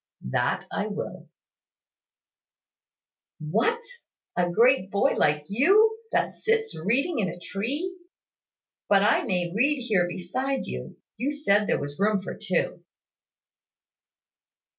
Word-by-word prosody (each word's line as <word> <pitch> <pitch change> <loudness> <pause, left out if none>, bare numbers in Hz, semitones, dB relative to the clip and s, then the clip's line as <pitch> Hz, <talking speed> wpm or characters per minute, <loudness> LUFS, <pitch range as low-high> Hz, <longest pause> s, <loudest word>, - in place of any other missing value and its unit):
"That - - 0
I - - -2
will." - - -6 2.1
"What, 220 - +1 0.6
a 175 -1 +1
great 230 +1 +4
boy 200 +8 +2
like 150 0 +2
you, 405 - +4
that - - +1
sits 450 0 -1
reading 260 - 0
in 190 -4 0
a 170 - -7
tree! 275 - -3 0.9
But 200 -1 +5
I 210 - +3
may 175 -2 -1
read 275 +4 +2
here 195 -7 +2
beside 255 +10 -2
you. 65 0 -7 0.2
You 265 +6 -1
said 210 -9 +2
there - - +1
was 145 +2 -6
room 205 0 +2
for 190 - -7
two." 185 -4 -2
210 Hz, 120 wpm, -26 LUFS, 180-275 Hz, 2.1 s, But